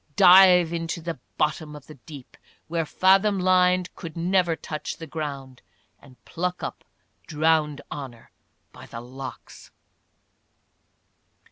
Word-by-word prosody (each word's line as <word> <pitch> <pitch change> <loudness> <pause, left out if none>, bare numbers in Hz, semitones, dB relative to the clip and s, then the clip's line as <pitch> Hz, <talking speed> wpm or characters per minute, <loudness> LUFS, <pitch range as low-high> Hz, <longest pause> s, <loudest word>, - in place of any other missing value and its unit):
' 145 - -38
dive 180 -2 +7
into 165 0 -3
the 165 -1 -6 0.2
bottom 150 0 -1
of 145 - -12
the 155 - -12
deep, 140 -1 -13 0.3
Where 165 0 -2
falhom 195 +4 +3
line 180 0 +3
could 165 -3 -9
never 175 0 +1
touch 155 -1 -6
the 165 - -8
ground, 140 -5 -7 0.4
And 130 -3 -20
pluck 180 +1 -4
up - - -6 0.4
drowned 155 -2 +1
honour 130 -5 -9 0.4
by - - -13
the 115 - -8
locks.' 130 +2 -10
160 Hz, 125 wpm, -24 LUFS, 145-180 Hz, 0.4 s, dive